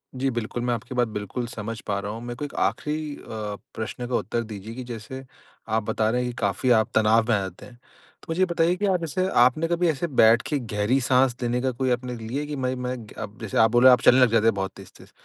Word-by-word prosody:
जी, 135 +1 0
बिल्कुल। 120 0 -3
मैं 120 0 +1
आपकी 120 +2 -6
बात 120 -1 +2
बिल्कुल 110 +3 -4
समझ 115 -1 -6
पा 100 -1 0
रहा 100 +1 -4
हूँ। 115 +2 -7
मेरे 120 0 -5
को 145 - -4
एक 145 - -9
आख़िरी 150 -1 -1
अ, - - -14 0.5
प्रश्न 115 +2 -5
का 125 - -1
उत्तर 115 - -1
दीजिए 110 0 -8
कि 130 - -6
जैसे 120 +2 -8 0.5
आप 110 0 +1
बता 110 -1 +1
रहे 125 +2 +1
हैं 125 - -2
कि - - -13
काफ़ी 100 +4 0
आप 110 - +1
तनाव 110 +1 +4
में 115 - +4
आ - - +1
जाते 95 -2 -7
हैं। 125 - -14 0.5
तो - - -16
मुझे 165 +2 -2
ये - - +6
बताइए 170 0 +1
कि 205 - -2
आप 190 -3 +2
जैसे 170 +3 -1
आपने 130 +7 +3
कभी 170 +1 +1
ऐसे 160 +2 -1
बैठ 115 +1 +6
के 150 - 0
गहरी 110 +2 0
साँस 130 0 +3
देने 120 0 -1
का 130 0 0
कोई 130 +1 -1
आपने 125 0 -2
लिया 120 +6 -4
कि 150 0 -5
मैं 130 -2 -1
मैं 125 0 -3 0.5
जैसे 110 -4 -4
आप 110 -1 +5
बोले 120 +2 +7
आप 125 - +5
चलने 130 - +6
लग 125 -3 +5
जाते 115 -1 +3
हैं 115 - +4
बहुत 95 -1 -2
तेज़-तेज़। - - -15
120 Hz, 255 wpm, -25 LUFS, 110-130 Hz, 0.5 s, बोले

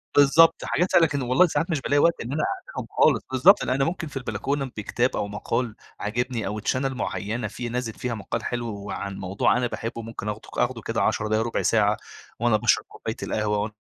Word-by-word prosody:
بالضبط، 145 +3 +6
حاجات 180 +2 0
أنا 165 - +7
كان 145 -2 -2
والله 130 +8 +4
ساعات 165 +3 -1
مش 150 -4 0
بالاقي 145 0 +2
وقت 170 +2 +3
إن 120 - -5
أنا 155 - 0
أعملهم 380 +7 -4
خالص، - - +4
بالضبط 130 -1 +6
لأن 130 - 0
أنا 135 0 +2
ممكن 165 -1 -3
في 135 - -7
البلكونة 135 +4 -2
بكتاب 120 +4 0
أو 100 - -1
مقال 115 +3 -2 0.2
عاجبني 115 +1 -2
أو 105 +2 -3
channel 130 +5 0
معينة 110 -1 -3
في 120 +3 -5
نازل 120 -2 -3
فيها 125 -2 -4
مقال 110 - -4
حلو 120 -1 -3 0.2
وعن 100 -1 -5
موضوع 95 +5 +1
أنا 125 -1 +1
باحبه، 115 0 -5
ممكن 110 -2 -6
آخده 105 +1 -6
ك - - -8
آخده 120 -2 0
كده 115 - -2
10 110 0 +1
دقايق، 110 +1 +1
ربع 115 - -1
ساعة، 105 -2 +3 0.4
وأنا 120 -2 +3
باشرب - - +2
كوباية - - -6
القهوة، 105 -1 0
وأنا 105 +1 -3
120 Hz, 210 wpm, -25 LUFS, 110-135 Hz, 0.4 s, أنا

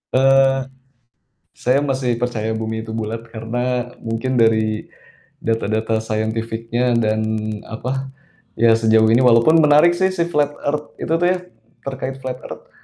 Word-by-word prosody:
Eee, 135 0 +4 0.9
saya 130 +3 +1
masih 130 -3 -1
percaya 120 -3 -2
bumi 110 0 -3
itu 110 - -10
bulat 110 0 -4
karena 120 +2 -3
mungkin 115 +3 -2
dari 110 -1 +1 0.5
data-data 110 0 -1
scientific-nya 115 +2 -1
dan 110 -1 +1 0.4
apa, 130 +4 -4 0.5
ya 115 +1 +4
sejauh 110 0 +4
ini 115 - +5
walaupun 125 +6 +5
menarik 150 +2 +6
sih 190 0 +2
si 175 - 0
flat 145 -2 +1
earth 150 +1 -3
itu - - -4
tuh 175 - +2
ya, 180 0 +2 0.5
terkait 135 0 -4
flat 130 -1 -4
earth. - - -11
120 Hz, 135 wpm, -20 LUFS, 110-135 Hz, 0.9 s, menarik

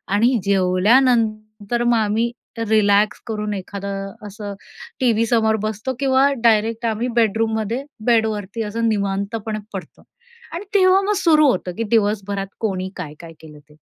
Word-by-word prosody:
आणि 240 +4 +3
जेवल्यानंतर 215 +3 +2
मग 240 -1 +3
आम्ही 220 +2 0 0.4
रिलॅक्स 210 -1 +3
करून 210 -2 -3
एखादं 195 0 -5
असं 205 0 -7 0.5
टीव्ही 230 -3 +2
समोर 220 -1 +2
बसतो 215 +4 -3
किंवा 270 0 +3 0.2
डायरेक्ट 225 0 +2
आम्ही 225 +2 -1
बेडरूम 225 -1 +2
मध्ये, 225 +5 -2 0.2
बेड 230 -2 +4
वरती 210 +1 -4
असं 225 +2 -2
निवांतपणे 205 +1 -2
पडतो. 190 -2 -8 0.5
आणि 345 +5 -5
तेव्हा 375 0 +5
मग 405 +1 0
सुरू 310 -5 +4
होतं, 185 -4 -3
की 230 - -1
दिवसभरात 205 -3 0
कोणी 190 -4 -2
काय-काय 165 -1 -8
केलं 150 -2 -13
ते. 150 +1 -23
215 Hz, 140 wpm, -20 LUFS, 200-235 Hz, 0.5 s, तेव्हा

